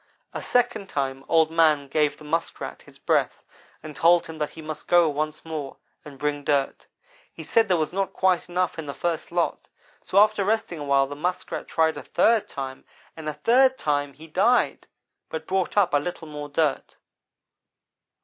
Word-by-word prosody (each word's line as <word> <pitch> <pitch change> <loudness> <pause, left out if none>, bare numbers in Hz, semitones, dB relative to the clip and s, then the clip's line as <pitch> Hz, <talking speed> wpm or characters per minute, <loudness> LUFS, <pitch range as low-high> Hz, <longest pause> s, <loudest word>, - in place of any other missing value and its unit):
A - - -4
second 215 -5 0
time 135 -1 -2
Old 160 -1 +4
man 155 -4 +3
gave 150 +1 +1
the - - -14
Muskrat 165 +3 -3
his - - -16
breath, - - 0 0.4
and 155 -1 -8
told 170 +3 +4
him 160 -1 -9
that 150 - -1
he - - -14
must 155 0 -7
go 175 -1 +5
once 155 +1 -3
more, 155 -4 -5 0.3
and 145 -2 -11
bring 145 0 -2
dirt. 140 -2 0 0.4
He 160 - -10
said 225 +7 +3
there 180 -2 +3
was 155 +1 -2
not 195 0 -1
quite 185 -1 +1
enough 180 -1 -1
in 155 - -6
the 140 - -5
first 170 +1 -3
lot, 175 -1 -1 0.3
so 190 - -3
after 210 0 +5
resting 215 -4 -1
a - - -5
while 140 -1 +3
the 145 +1 -7
Muskrat 180 +5 -3
tried 160 0 +1
a - - -5
third 225 -2 +2
time 135 -1 -6 0.3
and 155 -1 -5
a - - -3
third 255 - +3
time 145 -1 -1
he 155 +4 -13
died, 195 +10 +1 0.4
but 160 0 -5
brought 190 +2 -1
up 190 -5 +3
a 145 - +5
little 165 +1 -6
more 150 -1 -7
dirt. 145 -1 -1
160 Hz, 190 wpm, -25 LUFS, 145-180 Hz, 0.4 s, go